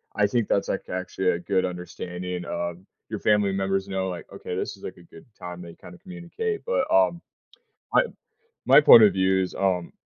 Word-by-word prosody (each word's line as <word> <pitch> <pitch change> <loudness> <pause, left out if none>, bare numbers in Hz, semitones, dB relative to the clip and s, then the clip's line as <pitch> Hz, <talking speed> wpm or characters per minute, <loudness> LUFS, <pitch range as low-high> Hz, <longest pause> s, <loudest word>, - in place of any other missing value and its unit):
I 105 - +3
think 115 0 0
that's, 100 - 0
like, - - -3
actually 95 0 -2
a 85 - -2
good 95 +1 0
understanding, 90 0 -6
um, 85 +2 -5 0.2
your 110 - -4
family 105 -2 +2
members 95 0 -1
know, 95 -1 -2
like, 90 - -8
okay, - - -6
this - - -4
is, - - -19
like, - - -7
a 85 - -16
good 80 - -16
time 90 0 -8
they 85 -1 -11
kinda 185 - -13
communicate. 185 - -5
But, - - 0
um, 255 - +3 0.7
I - - +5 0.6
my - - +7
point 115 - +9
of 100 - +5
view 95 0 +2
is, 90 - -4
um, 90 -3 -1
95 Hz, 195 wpm, -25 LUFS, 90-110 Hz, 0.7 s, point